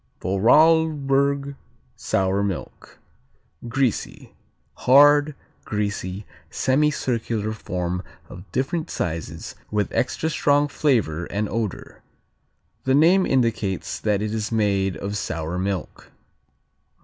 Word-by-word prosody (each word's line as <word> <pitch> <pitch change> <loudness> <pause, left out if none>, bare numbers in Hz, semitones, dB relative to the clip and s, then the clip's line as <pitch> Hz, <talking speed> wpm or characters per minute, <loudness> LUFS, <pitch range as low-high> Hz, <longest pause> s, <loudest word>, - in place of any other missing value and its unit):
Vorarlberg 140 - +3 0.4
Sour 95 +1 0
milk 100 -4 -5 0.7
Greasy 125 -1 -2 0.4
Hard; 145 +2 +5 0.3
greasy; 100 -2 -3 0.2
semicircular 125 -6 0
form 90 -4 -3 0.3
of 90 +3 -12
different 155 +5 -2
sizes, 80 -2 -4 0.2
with 105 -1 -1
extra 160 +5 -1
strong 145 -1 +2
flavor 115 - 0
and 105 +3 -2
odor. 105 -1 -4 0.8
The 130 0 +2
name 175 +6 +5
indicates 115 -7 0
that 105 -1 0
it 110 0 -3
is 110 0 -3
made 100 -4 +1
of 100 +1 -4
sour 85 -2 -3
milk. 95 -2 -4
110 Hz, 95 wpm, -23 LUFS, 95-140 Hz, 0.8 s, Hard